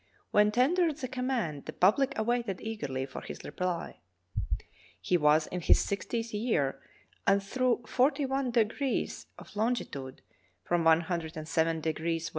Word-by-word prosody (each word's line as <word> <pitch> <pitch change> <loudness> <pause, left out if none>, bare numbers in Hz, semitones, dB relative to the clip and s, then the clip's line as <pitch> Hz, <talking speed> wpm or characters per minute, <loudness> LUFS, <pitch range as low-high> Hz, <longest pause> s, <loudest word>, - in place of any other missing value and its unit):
When 210 0 +5
tendered 310 +6 +3
the 265 -4 -4
command 250 - -2
the - - -6
public 265 +9 +3
awaited 230 -3 0
eagerly 145 -13 -3
for 135 - -8
his - - -8
reply. 180 - -3 1.0
He 180 - +1
was 155 -1 +4
in 180 - -4
his - - +6
sixtieth 230 +3 -2
year, 160 - 0 0.5
and 195 0 +4
through 245 +3 +1
forty 265 +6 +2
one 270 -1 0
degrees 240 +3 0
of - - -13
longitude 205 - -2 0.2
— 90 -1 -39
from 175 -1 +2
107° 160 -1 +1
W. 165 +1 -1
200 Hz, 135 wpm, -30 LUFS, 160-245 Hz, 1.0 s, his